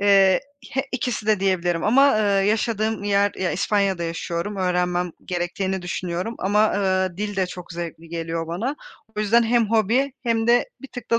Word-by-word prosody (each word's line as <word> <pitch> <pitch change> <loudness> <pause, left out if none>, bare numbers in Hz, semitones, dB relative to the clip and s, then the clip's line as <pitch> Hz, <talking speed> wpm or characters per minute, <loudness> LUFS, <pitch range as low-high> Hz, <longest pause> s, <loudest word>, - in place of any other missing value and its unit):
Eee, 195 -2 +5 0.3
h 270 - +2
ikisi 240 -4 -2
de 215 -3 +3
diyebilirim 175 -3 0
ama, 275 +6 +5
ııı, 200 -2 +2
yaşadığım 215 0 0
yer 200 0 +2
ya, 185 -1 0
İspanya'da 195 -1 +1
yaşıyorum, 170 +4 -3
öğrenmem 180 -1 0
gerektiğini 185 +2 -2
düşünüyorum 180 +4 -3
ama, 210 +3 +3
ııı, 185 -3 0
dil 205 0 -3
de 190 -1 +1
çok 180 -1 -9
zevkli 170 -1 -7
geliyor 165 0 -3
bana. 215 - -3 0.4
O - - 0
yüzden 225 +3 +4
hem 230 -1 +2
hobi 230 +5 +2
hem 230 -2 0
de 240 - +3
bir 275 - -9
tık 245 -3 -9
da 230 - +4
200 Hz, 170 wpm, -23 LUFS, 180-220 Hz, 0.4 s, Eee